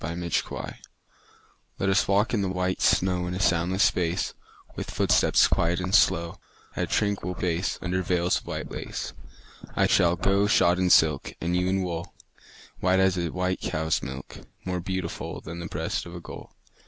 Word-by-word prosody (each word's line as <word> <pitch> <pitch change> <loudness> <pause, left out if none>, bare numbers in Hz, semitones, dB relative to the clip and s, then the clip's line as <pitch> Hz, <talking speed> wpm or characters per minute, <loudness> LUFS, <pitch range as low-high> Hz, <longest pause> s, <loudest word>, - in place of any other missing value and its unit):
VELVET 85 0 -4
SHOES - - -2 1.1
Let 95 - -1
us 95 - +3
walk 100 +4 +2
in 110 - +1
the 95 - 0
white 90 0 -1
snow 90 -1 +2
In 90 - -3
a - - -4
soundless 90 +1 +2
space; 85 0 +1 0.4
With - - -5
footsteps - - +3
quiet 85 +1 +1
and 90 +1 -3
slow, 85 -5 +3 0.4
At - - 0
a - - -13
tranquil 100 -3 -1
pace, 90 0 -1
Under 90 +1 0
veils 90 0 +1
of - - -20
white - - -5
lace. - - -5 0.6
I - - +3
shall 85 0 +3
go 100 +3 +2
shod 90 -2 +4
in 90 -1 +2
silk, 75 -5 +3
And 85 +1 -1
you 90 0 +1
in 95 0 +1
wool, 85 -2 -5 0.6
White 95 +1 +2
as 95 -1 +3
a 85 -2 -1
white 90 +2 -2
cow's 80 -1 -1
milk, 65 -1 -8 0.3
More 90 -1 -2
beautiful 95 -1 -4
Than 85 +2 -8
the 85 - -5
breast 80 +2 -3
of 85 - -9
a - - -6
gull. - - -10
90 Hz, 180 wpm, -26 LUFS, 85-95 Hz, 1.1 s, shod